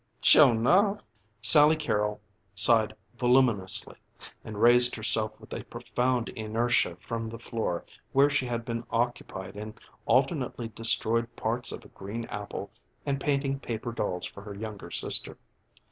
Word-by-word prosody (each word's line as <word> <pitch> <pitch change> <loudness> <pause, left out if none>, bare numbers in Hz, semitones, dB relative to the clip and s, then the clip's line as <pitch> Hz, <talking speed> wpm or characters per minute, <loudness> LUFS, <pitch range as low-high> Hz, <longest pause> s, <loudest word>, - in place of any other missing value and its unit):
"Sure 145 -5 +7
enough." 190 - +3 0.4
Sally 150 +8 +8
Carrol 105 -9 -1 0.4
sighed 110 0 +4 0.2
voluminously 120 -6 +2 0.5
and 105 -2 -7
raised 120 +2 +5
herself 110 -1 0
with - - -11 0.2
profound 125 -1 -1
inertia 110 -4 0
from 115 +5 -5
the 115 +1 -7
floor 110 -6 -3 0.3
where 140 +1 +5
she 145 -3 0
had 120 -1 -3
been 115 -1 -3
occupied 115 -6 -3
in 105 +1 -7 0.3
alternately 115 -1 +1
destroyed 115 +1 -1
parts 120 +2 -2
of - - -8
a - - -14
green 110 +4 -6
apple 105 -1 -6 0.3
and 140 -1 -1
painting 140 -1 0
paper 120 -2 -4
dolls 90 -6 -3
for 100 - -9
her 100 0 -8
younger 105 -1 -7
sister. - - -3
115 Hz, 135 wpm, -28 LUFS, 110-125 Hz, 0.5 s, Sally